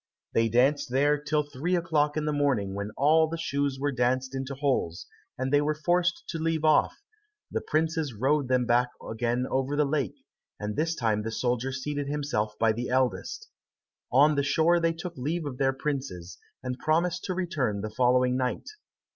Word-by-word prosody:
They 115 0 +3
danced 135 +5 +2
there 145 +4 +3
till 150 0 0
three 145 +5 -2
o'clock 155 -3 +1
in 155 - -1
the 150 - 0
morning 130 -10 +1
when 100 +1 -4
all 160 +3 +4
the 165 +1 -4
shoes 140 -4 -1
were 145 +1 0
danced 130 +1 0
into 135 +1 -4
holes, 130 - -1 0.3
and 130 +2 -2
they 145 - +5
were 150 +1 0
forced 175 +3 +1
to 165 - -3
leave 160 -1 0
off; 155 - +3 0.5
the - - -1
princes 160 -2 0
rowed 135 +5 +1
them 125 -1 +2
back 120 +1 +3 0.2
again 120 +2 -1
over 135 +2 0
the 150 0 +3
lake, 140 -7 -1 0.4
and 105 0 -3
this 160 +2 0
time 110 -6 0
the 110 - -3
soldier 125 +2 -1
seated 145 +2 -3
himself 140 -8 -2
by 115 -1 +3
the 120 +3 -3
eldest. 130 0 -1 0.6
On 145 +5 +5
the 140 - +1
shore 160 +5 +3
they 165 0 +1
took 175 +1 -7
leave 155 +5 -2
of 130 -3 -6
their 135 -1 +3
princes, 135 - -4 0.2
and 125 -1 -4
promised 170 +3 +1
to 185 - -2
return 145 - -1
the 110 +1 -4
following 125 +1 +3
night. 125 -1 -2
140 Hz, 185 wpm, -27 LUFS, 125-155 Hz, 0.6 s, they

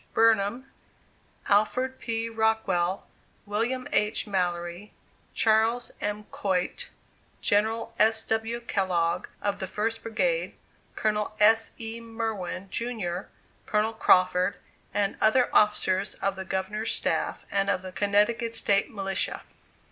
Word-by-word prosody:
Burnham, 225 +2 +3 0.8
Alford 250 +6 +2
P. 230 -1 -2
Rockwell, 220 -5 0 0.4
William 230 +5 -1
H. 210 0 +2
Mallory, 175 -1 -2 0.4
Charles 225 +2 +2
M. 210 0 -2
Coit, 185 -3 -1 0.5
General 220 +2 +1
S. 220 +1 +4
W. 225 +2 -1
Kellogg, 180 -5 0 0.2
of 205 -1 -1
the 190 - -3
First 225 +4 -2
Brigade; - - -1 0.4
Colonel 210 0 -1
S. 225 +2 +5
E. 225 0 -5
Merwin, 220 -5 -4
jr., 205 -7 -3 0.4
Colonel 215 +1 +1
Crawford, 185 -2 +3 0.4
and 200 -1 0
other 245 +3 +4
officers 200 -2 +2
of 195 0 -1
the 190 0 -6
Governor's 200 +4 -2
staff, - - -1
and 195 0 +1
of 185 -2 0
the 185 - -7
Connecticut 210 +4 +1
State 200 -2 +2
Militia. 195 -2 -2
210 Hz, 115 wpm, -27 LUFS, 195-225 Hz, 0.8 s, S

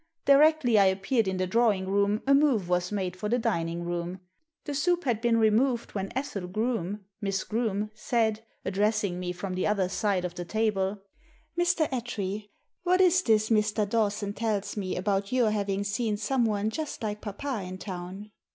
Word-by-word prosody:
Directly 280 -5 +5
I 200 - +6
appeared 195 +4 +1
in 190 -1 -1
the 185 - 0
drawing 200 -1 +2
room 200 +2 +1
a 275 - +4
move 275 -10 +3
was 180 +1 0
made 190 -3 -2
for 210 +3 -4
iJie 245 +2 +2
dining 170 -2 -1
room. 175 +1 -3 0.5
The 290 - -3
soup 350 +5 +1
had 235 -5 0
been 235 -1 +3
removed 230 +3 +2
when 195 -1 -3
Ethel 215 -9 -3
Groome 210 -1 -2
— 200 - -53
Miss 195 -2 -1
Groome 215 -2 -1
— - - -36 0.2
said, 225 -3 +2 0.2
addressing 205 -1 0
me 180 -1 -3
from 185 +1 -5
the 185 - 0
other 200 -3 +1
side 190 -1 0
of 175 - -4
the 175 - -5
table 200 -1 -1 0.3
— 310 - -35
"Mr. 345 -2 +2
Attree, 215 -5 -3 0.3
what 365 +1 +2
is 365 -1 +5
this 220 - +2
Mr. 210 -1 +2
Dawson 205 -2 0
tells 210 -2 -2
me 195 -3 -3
about 195 +1 -1
your 245 -4 +3
having 200 -1 -1
seen 210 +1 -1
someone 220 -3 0
just 305 -1 -5
like 210 -1 -3
papa 225 +3 -4
in 185 0 -6
town?" 190 +2 -7
210 Hz, 185 wpm, -28 LUFS, 190-235 Hz, 0.5 s, I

